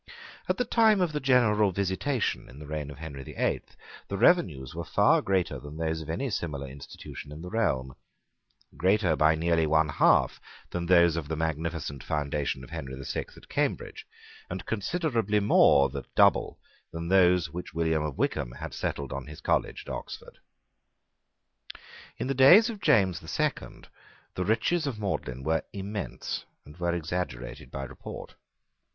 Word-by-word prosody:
At -, -, +1 dB
the 250 Hz, -, 0 dB
time 220 Hz, -3 st, +4 dB
of 180 Hz, -3 st, +1 dB
the 150 Hz, -, -2 dB
general 110 Hz, -7 st, +3 dB
visitation 100 Hz, +7 st, -1 dB
in 65 Hz, -, -13 dB
the 75 Hz, -, -9 dB
reign 75 Hz, -1 st, -4 dB
of 70 Hz, -, -9 dB
Henry 70 Hz, -3 st, -7 dB
the 65 Hz, -, -10 dB
Eighth -, -, -2 dB, 0.3 s
the 100 Hz, -, -3 dB
revenues 90 Hz, -, +3 dB
were -, -, -4 dB
far -, -, +3 dB
greater 95 Hz, -2 st, 0 dB
than 75 Hz, +1 st, -10 dB
those 80 Hz, 0 st, -1 dB
of 80 Hz, -, -9 dB
any 130 Hz, +10 st, -2 dB
similar 75 Hz, -8 st, -3 dB
institution 70 Hz, +1 st, -10 dB
in 75 Hz, +3 st, -8 dB
the 90 Hz, -, -7 dB
realm, 65 Hz, -, 0 dB, 0.8 s
greater 95 Hz, +2 st, +2 dB
by 75 Hz, +1 st, +4 dB
nearly 80 Hz, 0 st, +2 dB
one 80 Hz, 0 st, +3 dB
half -, -, +3 dB, 0.3 s
than 85 Hz, -1 st, -3 dB
those 85 Hz, -2 st, +5 dB
of 80 Hz, -3 st, -3 dB
the 80 Hz, -, -2 dB
magnificent 80 Hz, -3 st, -3 dB
foundation 75 Hz, -3 st, -2 dB
of -, -, -12 dB
Henry 65 Hz, -1 st, -5 dB
the 70 Hz, +1 st, -8 dB
Sixth -, -, -5 dB
at -, -, -15 dB
Cambridge, -, -, -2 dB, 0.4 s
and 90 Hz, +1 st, -5 dB
considerably 115 Hz, -, 0 dB
more 70 Hz, -8 st, +5 dB
than 70 Hz, -1 st, -6 dB
double -, -, +4 dB, 0.3 s
those 90 Hz, +1 st, +3 dB
which 90 Hz, -1 st, -7 dB
William 80 Hz, -1 st, +1 dB
of 75 Hz, -3 st, -4 dB
Wykeham -, -, -1 dB
had -, -, -7 dB
settled 70 Hz, -2 st, -3 dB
on 70 Hz, 0 st, -5 dB
his 75 Hz, 0 st, -10 dB
college -, -, 0 dB
at -, -, -5 dB
Oxford. -, -, -8 dB, 1.8 s
In -, -, -3 dB
the 135 Hz, -, 0 dB
days 175 Hz, -, +7 dB
of 210 Hz, -3 st, -10 dB
James 95 Hz, -, +3 dB
the 80 Hz, -, -14 dB
Second -, -, -3 dB, 0.5 s
the 90 Hz, -, -2 dB
riches 130 Hz, -, +1 dB
of 120 Hz, -6 st, -4 dB
Magdalene 65 Hz, -10 st, -3 dB
were 80 Hz, +2 st, +1 dB
immense, 100 Hz, +1 st, -4 dB, 0.2 s
and 75 Hz, -, -13 dB
were 85 Hz, -1 st, 0 dB
exaggerated 80 Hz, -8 st, -4 dB
by 70 Hz, -, -5 dB
report. 65 Hz, -, -9 dB
85 Hz, 165 wpm, -28 LUFS, 75-105 Hz, 1.8 s, days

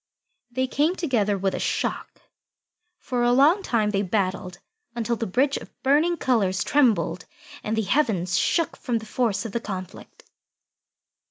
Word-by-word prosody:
They 260 Hz, +2 st, -1 dB
came 295 Hz, +7 st, +1 dB
together 220 Hz, -, 0 dB
with 195 Hz, 0 st, -1 dB
a -, -, -3 dB
shock. -, -, -3 dB, 0.7 s
For 250 Hz, -3 st, -3 dB
a 240 Hz, 0 st, +3 dB
long 290 Hz, +10 st, +5 dB
time 220 Hz, -, 0 dB
they 200 Hz, -1 st, 0 dB
battled, 185 Hz, -2 st, -2 dB, 0.4 s
until 235 Hz, 0 st, -1 dB
the 230 Hz, 0 st, -3 dB
bridge 265 Hz, +8 st, +1 dB
of -, -, -10 dB
burning 305 Hz, +6 st, +3 dB
colours 205 Hz, -, +1 dB
trembled 215 Hz, -, +2 dB, 0.4 s
and 220 Hz, +1 st, -2 dB
the 220 Hz, -, +1 dB
heavens 195 Hz, -, +1 dB
shook 335 Hz, -3 st, +1 dB
from 240 Hz, -2 st, -2 dB
the 220 Hz, -, -7 dB
force 230 Hz, -1 st, -1 dB
of 225 Hz, -, -5 dB
the 235 Hz, -, -2 dB
conflict. 185 Hz, -5 st, -8 dB
230 Hz, 155 wpm, -24 LUFS, 195-265 Hz, 0.7 s, long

